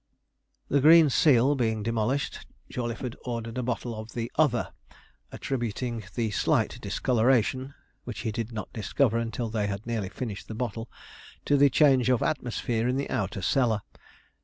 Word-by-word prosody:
The 140 - +2
'green 160 0 +7
seal' 135 -1 +4
being 110 -5 0
demolished, 115 +5 -1 0.2
Jawleyford 120 0 -4
ordered 115 -1 -4
a - - 0
bottle 120 -1 -3
of 110 0 -8
the 115 0 -4
'other,' 145 -7 +2 0.6
attributing 120 -3 -3
the 115 -3 0
slight - - +1
discoloration 130 +2 +1 0.3
(which 115 -4 -6
he 115 -2 -2
did 115 +1 -4
not 110 -2 -6
discover 115 +3 +1
until 115 0 -3
they 105 -2 0
had 100 +1 -4
nearly 110 -5 -2
finished 105 -2 -6
the 110 - -6
bottle) 115 -1 -4 0.6
to 145 -1 +5
change 130 -3 +4
of 125 -2 +2
atmosphere 120 -4 -1
in 125 +1 0
the 140 - -3
outer 100 -4 -2
cellar. 115 -2 +2
120 Hz, 150 wpm, -27 LUFS, 110-130 Hz, 0.6 s, green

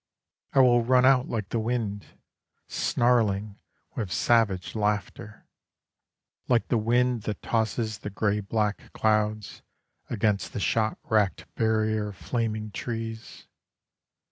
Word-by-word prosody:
I 135 - +6
will 120 -2 +5
run 125 +1 +4
out 130 -1 +4
like 105 -4 -3
the 115 - -1
wind, 110 -3 -2 0.6
Snarling, 105 -4 +1 0.3
with 100 -5 -4
savage 105 -6 +2
laughter; 105 +1 -3 1.0
Like 120 -2 +2
the 120 - +2
wind 120 +2 +2
that 105 - -5
tosses 110 -1 -1
the 105 - -6
grey 105 +1 0
black 105 0 -2
clouds, 110 -1 0 0.5
Against 105 -2 0
the - - -3
shot 110 +2 0
racked 105 -3 +1
barrier 110 -1 +1
of 100 -3 -9
flaming 110 -3 -2
trees. 115 0 -6
110 Hz, 115 wpm, -27 LUFS, 105-115 Hz, 1.0 s, I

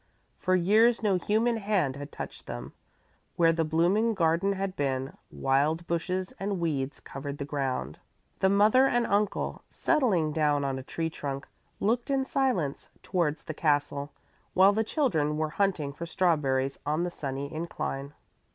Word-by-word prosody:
For 185 -1 +2
years 220 +7 +4
no 200 -3 +3
human 225 +5 +1
hand 200 -10 0
had 145 0 -8
touched - - -8
them. 65 +3 -6 0.6
Where 165 -1 +4
the 165 0 +1
blooming 180 +9 +2
garden 170 +3 +2
had 195 -1 -3
been 135 -1 -2
wild 145 +5 +1
bushes 180 +2 -2
and 195 -1 -2
weeds 140 -5 -2
covered 140 +1 -7
the 140 - -4
ground. 135 - -3 0.4
The 190 - +4
mother 215 +7 +5
and 240 -2 +2
uncle, 205 -1 0
settling 185 - +1
down 150 -2 +2
on 135 -1 -2
a - - -5
tree 160 +4 -3
trunk, 140 -3 -5 0.3
looked 235 +6 0
in 270 -1 +1
silence 245 - -1
towards 165 -5 0
the 155 - -5
castle, 145 -2 0 0.4
while 190 +2 +6
the 220 +2 +1
children 160 - 0
were 155 0 0
hunting 175 -7 0
for 170 +3 -6
strawberries 140 -7 +1
on 150 +3 0
the 175 - -2
sunny 140 -3 -5
incline. 145 -3 -4
165 Hz, 155 wpm, -28 LUFS, 145-200 Hz, 0.6 s, while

